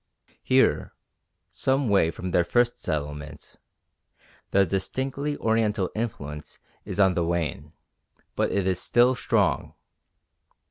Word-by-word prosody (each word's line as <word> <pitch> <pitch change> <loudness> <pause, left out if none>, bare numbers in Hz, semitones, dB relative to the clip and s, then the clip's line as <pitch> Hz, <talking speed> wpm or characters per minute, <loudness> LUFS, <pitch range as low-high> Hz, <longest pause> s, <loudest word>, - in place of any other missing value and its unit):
Here, - - +2 0.6
some 135 0 0
way 100 -6 +3
from 90 +2 -5
their 90 - +3
first 120 +7 +1
settlement, 75 0 -5 0.9
the 100 0 +4
distinctly 135 +9 -2
Oriental 110 -4 +1
influence 75 -10 -5 0.3
is 100 -1 -5
on 95 -2 +5
the 85 - 0
wane, 80 -3 -2 0.6
but - - 0
it 100 -2 0
is 95 -1 0
still 120 +2 +4
strong. 125 -3 0
95 Hz, 110 wpm, -26 LUFS, 85-120 Hz, 0.9 s, on